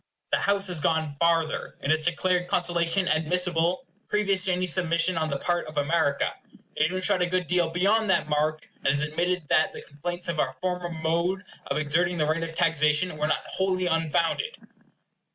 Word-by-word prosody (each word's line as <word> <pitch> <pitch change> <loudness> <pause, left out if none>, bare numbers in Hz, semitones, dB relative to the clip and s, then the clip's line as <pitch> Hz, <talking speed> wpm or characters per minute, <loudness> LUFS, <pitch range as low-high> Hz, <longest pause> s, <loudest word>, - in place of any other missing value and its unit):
The - - +3
House 200 0 +1
has 180 -4 -3
gone 160 -2 0
farther; 165 -2 0
it 140 - -1
has 155 0 +1
declared 180 +1 +1
conciliation 175 +1 0
admissible, 170 +2 0 0.2
previous 200 -2 +2
to 190 - +1
any 180 0 0
submission 175 0 +2
on 160 -1 -1
the 140 - -1
part 175 +4 -1
of 155 0 -9
America. 145 -1 +1 0.4
It - - -2
has 155 - +5
even 185 +1 -3
shot 195 -2 +3
a 180 - +2
good 180 0 -1
deal 175 -1 +1
beyond 200 +6 +2
that 190 - +2
mark, 155 +1 -1
and - - -4
has 145 +1 0
admitted 175 +4 -1
that 155 - +3
the - - -9
complaints 175 +5 -5
of 170 -2 -2
our 130 -2 0
former 180 -1 -2
mode 170 +4 -1 0.2
of - - -1
exerting 170 +4 +1
the 155 - +1
right 155 +2 0
of 165 0 -6
taxation 155 +1 +2
were 150 0 -1
not - - 0
wholly 185 -1 -1
unfounded. 165 - 0
170 Hz, 190 wpm, -26 LUFS, 155-180 Hz, 0.4 s, has